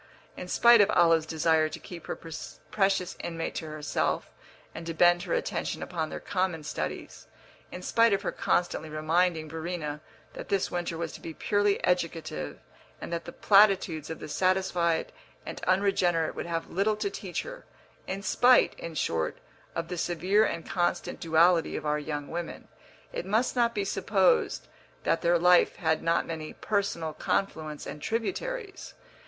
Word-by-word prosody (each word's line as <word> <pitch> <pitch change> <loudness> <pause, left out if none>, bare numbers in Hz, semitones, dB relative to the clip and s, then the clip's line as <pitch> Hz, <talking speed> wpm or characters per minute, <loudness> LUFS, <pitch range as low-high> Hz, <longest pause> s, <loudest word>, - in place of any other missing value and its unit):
In 180 - -7
spite 235 +4 +6
of 205 - +4
Olive's 165 -4 +4
desire 160 0 +2
to 160 +1 -7
keep 170 +1 -10
her - - -3
precious 180 +4 -2
inmate 165 -1 -4
to 160 - -5
herself 150 - -2 0.4
and 165 - -7
to 165 - -4
bend 175 +1 +5
her 175 -2 -1
attention - - -2
upon 160 -3 -3
their - - -5
common 185 -5 -1
studies, 80 - -5 0.4
in 180 - -8
spite 230 +3 +4
of 200 - +1
her - - -1
constantly 160 -3 0
reminding 160 +1 +1
Verena 160 -2 -4 0.3
that - - -8
this 195 -2 0
winter 175 -2 -3
was 165 -1 -3
to - - -10
be 165 -1 -7
purely 205 -1 +1
educative 165 - -1 0.4
and - - -6
that 170 -1 -3
the 170 - -7
platitudes 195 -7 +4
of 160 - -4
the - - -8
satisfied 180 -1 +1 0.3
and - - -7
unregenerate 185 -3 +2
would - - -5
have 165 -1 -3
little 205 +4 +1
to 210 -1 -2
teach 190 -2 -4
her, - - -9 0.4
in 195 +1 -4
spite, 245 +5 +5
in 165 -1 -7
short, 80 - -1 0.4
of 165 0 -2
the 180 0 -4
severe 185 +6 +2
and 170 -6 -2
constant 175 -2 -1
duality 165 +1 +3
of - - -4
our 150 0 +1
young 150 -1 -4
women, 170 0 -6 0.5
it - - -3
must 220 +8 +1
not 235 -1 +2
be 200 -1 0
supposed 190 - +1 0.4
that - - +1
their 175 +1 +3
life 180 +1 +5
had 160 -2 0
not 165 0 +1
many 160 -2 -6
personal 200 -7 -2
confluents 155 -2 -2
and 150 - -7
tributaries. 385 - -4
170 Hz, 165 wpm, -28 LUFS, 160-195 Hz, 0.5 s, spite